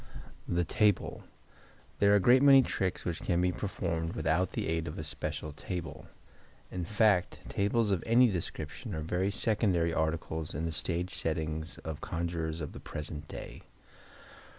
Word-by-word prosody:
The 85 0 +1
Table.—There 100 0 -1
are - - +7
a - - +6
great 125 +6 +6
many 135 -1 +8
tricks 95 -6 -2
which 85 -2 -2
can 85 - +1
be 90 0 +2
performed 85 -4 -2
without 80 +3 +1
the - - -2
aid 80 +1 -1
of 75 - -5
a 80 - -4
special 75 0 -4
table; 85 +1 -6 0.6
in 90 -2 -3
fact, 105 -2 +2
tables 105 +2 +1
of 95 -4 +1
any 120 +2 +6
description 85 - -5
are 80 - -3
very 90 +5 0
secondary 100 -6 +1
articles 80 -1 -2
in 80 +3 -2
the 85 - -1
stage 85 +3 -2
settings 80 +1 -1
of 80 -2 -5
conjurers 85 -1 -3
of 75 - -4
the - - -9
present 75 0 -6
day. - - -8
85 Hz, 155 wpm, -31 LUFS, 80-100 Hz, 0.6 s, many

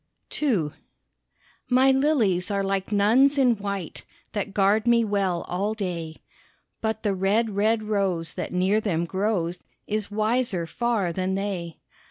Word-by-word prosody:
II 200 - +1 1.0
My 260 +2 +5
lilies 250 - +2
are 200 -1 0
like 195 +1 -2
nuns 235 +8 +4
in 250 -4 +4
white 200 -4 -5 0.3
That 205 -2 -3
guard 205 +3 +2
me 235 -1 +5
well 195 -4 0
all 200 +4 -1
day, 170 -6 -4 0.7
But 220 0 -2
the 205 -2 +1
red, 205 +4 +1
red 215 +2 +1
rose 190 -6 -1
that - - -5
near 190 +4 +2
them 170 -6 -1
grows 180 -2 -1 0.3
Is 215 -1 -3
wiser 215 -3 0
far 215 -2 -1
than 185 +2 -1
they. 190 -4 -4
200 Hz, 140 wpm, -25 LUFS, 185-220 Hz, 1.0 s, My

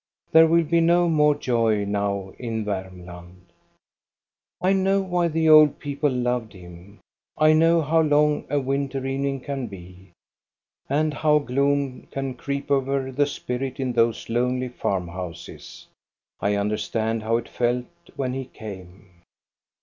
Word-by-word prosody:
There 160 0 +7
will 170 +1 +3
be 165 +2 +2
no 175 +1 +3
more 150 -2 +3
joy 115 -6 0
now 100 -1 -2
in 115 -3 -3
Varmland. 90 -2 -8 1.1
I 185 +2 +2
know 195 +1 +2
why 180 -2 0
the 160 0 0
old 155 -2 +7
people 145 +1 -1
loved 125 -4 -2
him. 90 +2 -14 0.4
I 155 0 +5
know 165 +1 +4
how 160 +2 +2
long 150 -1 +2
a 145 +1 +1
winter 135 0 -2
evening 135 0 -2
can 135 -2 -4
be, 95 -1 -13 0.8
and 150 +2 +1
how 150 0 +3
gloom 140 -1 -1
can 135 -1 -4
creep 140 +3 -5
over 135 -1 0
the 145 +2 +1
spirit 130 -1 -4
in 130 -2 -1
those 115 -1 +1
lonely 125 +2 -1
farm 95 -7 -2
houses. 85 -1 -9 0.5
I 100 0 0
understand 110 +2 -1
how 115 +2 +1
it 120 - -6
felt 120 0 -1 0.3
when 130 -2 -2
he 135 0 -4
came. 95 -5 -11
130 Hz, 140 wpm, -24 LUFS, 105-150 Hz, 1.1 s, There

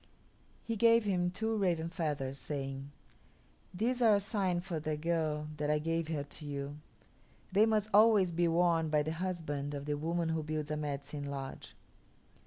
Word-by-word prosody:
He 230 - -2
gave 230 +1 +5
him 180 -4 +1
two 220 +5 -1
raven 175 -6 +1
feathers, 145 -5 -3
saying: 135 0 -5 0.8
"These 235 +7 -1
are 220 -3 +6
a - - +3
sign 195 -4 0
for 175 -2 -4
the 155 0 -2
girl 155 -2 -1
that 150 0 -1
I 150 - +3
give 165 +1 -1
her 155 -3 -2
to 145 +2 -9
you. 140 0 -4 0.7
They 205 +4 +5
must 215 -2 +2
always 210 -3 +6
be 170 +1 +2
worn 165 -1 +2
by 150 -1 +3
the 155 - -2
husband 160 -5 -3
of 140 0 -5
the 150 0 -1
woman 165 +1 -1
who 160 0 0
builds 155 0 -3
a - - 0
Medicine 145 -1 -4
Lodge." 135 -1 -6
160 Hz, 175 wpm, -33 LUFS, 150-185 Hz, 0.8 s, are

